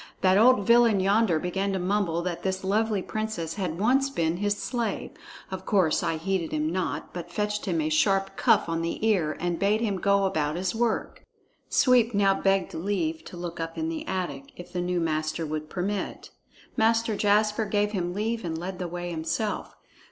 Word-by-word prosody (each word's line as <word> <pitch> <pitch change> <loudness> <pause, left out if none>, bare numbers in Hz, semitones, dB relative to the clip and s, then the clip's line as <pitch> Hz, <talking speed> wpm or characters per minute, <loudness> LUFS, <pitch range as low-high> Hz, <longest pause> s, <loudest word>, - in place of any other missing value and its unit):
That 185 0 +4
old 240 -3 +5
villain 235 -3 +5
yonder 195 -2 +3
began 190 +4 -1
to - - 0
mumble 180 -2 0
that 175 -1 -3
this 190 0 -2
lovely 210 0 +1
princess 215 -7 -3
had 180 -5 -3
once 265 +6 +3
been 165 -9 -1
his 205 +1 0
slave. 235 -2 -3 0.4
Of 190 0 -5
course, 185 -7 +3
I 165 - -1
heeded 180 0 -2
him 155 +1 -1
not, 185 0 -3
but 175 -1 -7
fetched 210 +3 -2
him 170 -3 0
a 155 0 0
sharp 195 +4 +2
cuff - - +3
on 165 0 -1
the 170 +6 -2
ear 165 -9 +1
and 175 -1 -1
bade 205 +2 +2
him 210 -4 -1
go 200 +1 +2
about 155 -5 0
his 180 +1 -1
work." 230 0 -1 0.5
Sweep 245 -4 +4
now 200 -1 +4
begged 195 -1 +1
leave 165 -3 -2
to 180 - -9
look 170 -1 -6
up 165 0 -4
in 320 0 -1
the 315 -1 -5
attic, 145 -7 -4
if 175 +1 -11
the 180 - -1
new 180 0 0
master 155 0 -1
would 155 0 -4
permit. 195 +2 -3 0.4
Master 225 0 +2
Jasper 210 +2 +2
gave 205 0 0
him 180 -3 -2
leave 225 +3 -1
and 165 -2 -3
led 180 +2 -5
the 180 - -3
way 175 +1 -5
himself. 170 +6 -3
190 Hz, 190 wpm, -26 LUFS, 170-210 Hz, 0.5 s, old